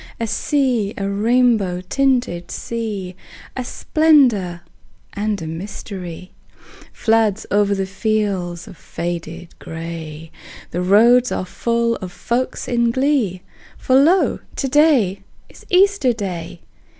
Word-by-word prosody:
A 230 - -1
sea, 240 -3 0
a 195 - -2
rainbow 210 -3 +2
tinted 245 -9 0
sea, 210 -6 -4 0.4
A 255 - -3
splendor 245 - +2 0.5
and 210 0 -2
a - - -5
mystery, 180 +1 -7 0.6
Floods 220 -2 +1
o'er 205 0 +4
the 195 0 -1
fields 195 -3 -2
of - - -12
faded 170 0 -6
gray: 160 -1 -7 0.4
The 175 - -2
roads 235 +7 +5
are - - -2
full 235 +4 0
of 185 -3 -7
folks 245 +7 -2
in 235 -1 +2
glee, 240 -8 0 0.3
For 260 - +1
lo, 325 +8 +4 0.2
to 275 - -1
day 260 - +3 0.3
is - - -17
Easter 375 -8 +4
Day! 175 -6 -6
210 Hz, 115 wpm, -20 LUFS, 180-245 Hz, 0.6 s, roads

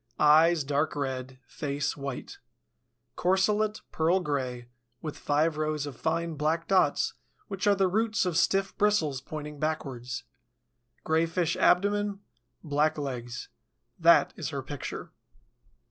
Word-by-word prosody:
Eyes, 155 +2 +5
dark 145 +3 0
red; 130 -2 -3
face, 145 +1 -3
white. 140 -2 -6 0.8
Corselet, 210 +4 +1
pearl 165 +4 +2
gray, 130 -7 -3 0.3
with 155 -2 -5
five 150 +2 +1
rows 155 -1 -1
of 145 -3 -7
fine 165 +7 -1
black 155 +3 -1
dots, 190 -1 +2 0.4
which 195 0 -2
are 205 - +5
the 195 -1 +3
roots 215 +2 +1
of 180 -3 -1
stiff 195 +2 +2
bristles 160 -11 +2
pointing 150 +1 -7
backwards. 130 -5 -3 0.8
Grayish 165 +1 +1
abdomen. 205 +2 +2 0.4
Black 155 0 +1
legs. 125 -4 -5 0.5
That - - +5
is - - -4
her - - -4
picture. - - -6
155 Hz, 120 wpm, -28 LUFS, 140-185 Hz, 0.8 s, Eyes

